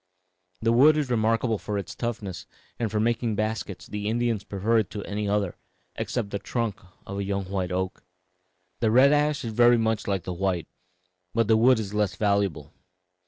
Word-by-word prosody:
The 115 - +3
wood 145 +6 +6
is 145 -4 -1
remarkable 115 -1 +1
for 105 -1 -3
its 100 - -5
toughness, 105 -7 -5 0.3
and 115 -2 0
for 105 - -1
making 115 0 0
baskets 110 -2 -3
the 105 0 -4
Indians 115 -2 0
prefer 105 +4 +1
it 105 - -1
to 105 - -6
any 105 0 -3
other, 100 -3 0 0.4
except 110 -5 -3
the 100 - -2
trunk 115 -3 -3 0.2
of 100 +1 -5
a - - -1
young 100 0 -2
white 95 -2 -1
oak. 95 +1 -3 0.8
"The 115 - +2
red 130 +5 +6
ash 150 -2 +1
is 115 - -4
very 120 +1 +6
much 110 -2 0
like 95 -4 -1
the 90 - -4
white, 90 -2 -1 0.7
but 115 -2 +2
the 110 - +5
wood 125 +3 +5
is 105 -2 -4
less 105 -3 0
valuable. 100 -8 0
105 Hz, 185 wpm, -26 LUFS, 100-115 Hz, 0.8 s, wood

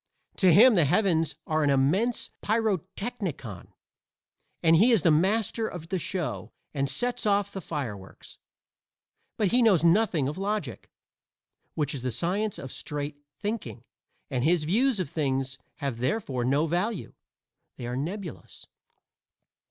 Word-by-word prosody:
To 185 -2 +5
him 230 +9 +8
the 175 -7 +4
heavens 165 -2 +2
are 155 0 0
an 145 - +2
immense 160 - +1
pyrotechnicon 195 - -2 1.0
and 165 0 +6
he 220 +9 +5
is 220 -9 +3
the 165 - +5
master 215 +7 +2
of 165 -2 -8
the 190 - -1
show 175 0 -3 0.2
and 140 -2 -1
sets 245 - -1
off 200 -1 +2
the 195 - -6
fireworks. 115 - -7 1.0
But 210 -3 +2
he 250 +5 +4
knows 200 -8 +4
nothing 170 -5 +3
of 150 +6 -4
logic, 195 - -3 0.9
which 150 -1 -1
is 135 - -5
the 130 - -2
science 190 - -1
of 135 - -7
straight 145 0 -5 0.2
thinking, 205 - -4 0.5
and 125 -2 0
his 165 +1 +3
views 225 - +2
of 185 - -1
things 135 -3 -2 0.2
have 135 -5 -4
therefore 130 - -1
no 140 +5 +2
value; 180 +5 -2 0.6
they 120 - -6
are 120 +1 -3
nebulous. 175 +6 -6
170 Hz, 140 wpm, -27 LUFS, 140-205 Hz, 1.0 s, him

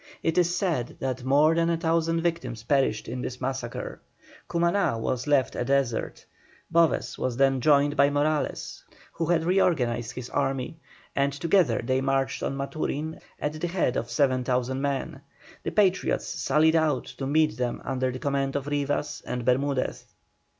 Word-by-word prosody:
It 165 - +1
is 175 0 +2
said 165 - -1
that 130 -1 -3
more 145 +5 +4
than 165 0 +2
a 170 - +1
thousand 165 0 +1
victims 165 -9 -2
perished 130 -4 +1
in 125 +2 -4
this 125 0 -5
massacre. 130 -2 -4 0.5
Cumaná 170 - +1
was 125 +4 -2
left 140 -3 +2
a - - -1
desert. 135 -3 -1 0.5
Boves 170 -1 +2
was 125 -2 -2
then 135 -1 +3
joined 145 +1 +4
by 140 0 +5
Morales, 145 +1 -1 0.3
who 165 - -3
had 165 -1 +2
reorganized 135 -10 +1
his 125 -1 -6
army, 135 +2 -1 0.4
and 140 0 +2
together 150 - +2
they 130 +2 +1
marched 135 0 0
on 135 - -2
Maturin 155 +2 -3 0.2
at 155 +1 -3
the 175 - 0
head 170 -7 0
of 120 - -2
7,000 130 0 +1
men. 140 -1 -2 0.4
The - - -3
Patriots 195 -2 +2
sallied 155 +3 +2
out 155 -5 +2
to 135 - -6
meet 155 -2 +2
them 125 -1 -2
under 130 -1 0
the 125 - -5
command 140 0 -1
of 140 -1 -1
Rivas 145 0 -2
and 125 -1 -3
Bermudez. 135 +1 0
140 Hz, 160 wpm, -26 LUFS, 130-160 Hz, 0.5 s, by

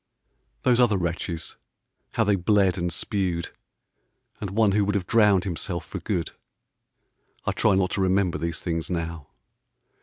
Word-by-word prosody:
4e - - -55
H* - - -47
Those 125 -1 +3
other 115 -5 +4
wretches, 85 -2 -3 0.6
how - - +2
they 100 0 +3
bled 95 0 +3
and 85 -1 -2
spewed, 90 -1 -2 0.9
And 100 - -4
one 105 +1 +3
who 105 +1 +3
would 105 +1 0
have 95 -3 0
drowned 105 -3 +4
himself 85 -1 -3
for - - -6
good, 85 -2 -2 0.6
— - - -42
I - - +1
try 105 -3 +3
not 95 -1 +1
to 100 - -1
remember 95 -1 +2
these 85 0 -3
things 85 -2 -2
now. 85 -3 -4
95 Hz, 170 wpm, -25 LUFS, 85-100 Hz, 0.9 s, other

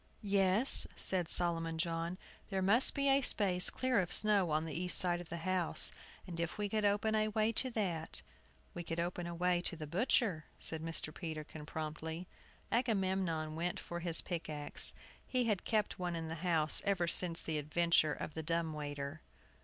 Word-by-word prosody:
"Yes," 200 +4 +9
said 180 -3 +3
Solomon 165 -2 +1
John, 165 +2 -4 0.3
"there 190 -2 -3
must 220 +7 +4
be 280 0 -1
a 275 0 +3
space 185 -7 0
clear 255 -3 -1
of 180 -2 -3
snow 205 -5 +2
on 155 +1 -1
the 160 - -7
east 180 +2 +3
side 175 -1 +3
of 175 - -13
the 170 - -6
house, 180 0 +1 0.3
and 170 -3 -8
if 170 +3 -4
we 210 -1 -3
could 215 +1 -3
open 205 +2 0
a 215 0 0
way 215 +1 -1
to 255 +3 +2
that 170 - -4 0.2
" - - -34
"We 175 - -7
could 165 0 -6
open 175 0 -4
a 170 - -7
way 180 0 0
to 175 - -2
the 155 -1 -8
butcher," 185 - -1
said 160 -1 -4
Mr. 160 -1 -5
Peterkin, 155 -2 -8
promptly. 160 +3 -7 0.4
Agamemnon 190 -9 -2
went 175 +2 -4
for 175 - -8
his 170 -1 +3
pick 170 -3 -6
axe. 150 -1 +1 0.3
He 255 -1 -1
had 210 -5 -2
kept 215 -4 -2
one 175 -1 -4
in 165 -1 -6
the - - -5
house 165 -4 0
ever 195 -4 -1
since 170 -1 -1
the 155 -2 -3
adventure 155 0 +1
of 155 - -8
the 160 - -6
dumb 165 0 -3
waiter. 145 0 -7
175 Hz, 190 wpm, -33 LUFS, 160-200 Hz, 0.4 s, Yes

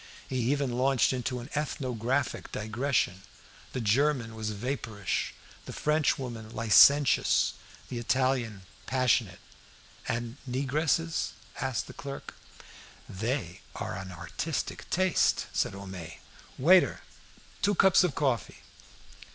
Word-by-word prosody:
He 130 - -2
even 140 -3 0
launched 130 +1 +2
into 125 0 -2
an 120 - -10
ethnographic 130 -3 -2
digression: 110 -3 -1 0.5
the - - -2
German 120 +1 +2
was 110 -1 -4
vapourish, 110 -3 -3 0.3
the - - -7
French 150 0 +2
woman 115 -4 -6
licentious, 125 +6 +5 0.3
the 120 - -4
Italian 120 -4 0 0.2
passionate. 125 -7 +2 0.7
"And 120 +2 -3
negresses?" 150 +5 0 0.3
asked 130 -4 -1
the - - -11
clerk. 140 -1 -7 0.7
"They 110 - -3
are - - -4
an 95 0 -7
artistic 90 - -4
taste!" 185 0 +2
said - - 0
Homais. 95 -4 -8 0.4
"Waiter! 180 +7 +5 0.6
two 205 0 +2
cups 190 0 +6
of 175 -6 0
coffee!" 130 -6 -1
125 Hz, 110 wpm, -29 LUFS, 110-140 Hz, 0.7 s, cups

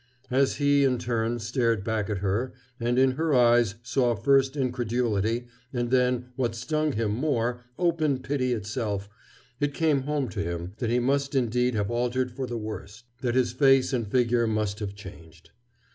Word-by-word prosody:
As 135 +1 +2
he, 145 -1 +3
in 130 -2 +2
turn, 120 -1 -1
stared 115 -2 0
back 110 -2 -1
at 105 - -1
her, 110 +7 -1 0.3
and 120 +1 0
in 130 0 +5
her 155 +2 0
eyes 120 -3 +4
saw 120 -1 +1
first 135 +5 +2
incredulity, 120 -3 0 0.3
and 120 -2 -2
then, 125 -1 +2
what 120 -3 -1
stung 155 +5 -1
him 110 -2 0
more, 120 -1 0 0.2
open 160 -5 +1
pity 130 -1 -1
itself, 105 -3 -2 0.5
it 145 -1 -1
came 155 -4 +2
home 145 -1 -1
to 100 - -4
him 85 0 -4
that 120 - -2
he 120 - +2
must 140 +3 0
indeed 125 -1 +1
have 105 0 -1
altered 125 +1 0
for 130 +1 -4
the 120 - -4
worse, 105 +1 -7 0.2
that 120 -2 0
his 125 -2 +2
face 135 +1 +4
and 120 -4 -1
figure 120 +1 +2
must 105 -2 -1
have 100 -2 -5
changed. 85 -5 -13
120 Hz, 175 wpm, -26 LUFS, 110-130 Hz, 0.5 s, in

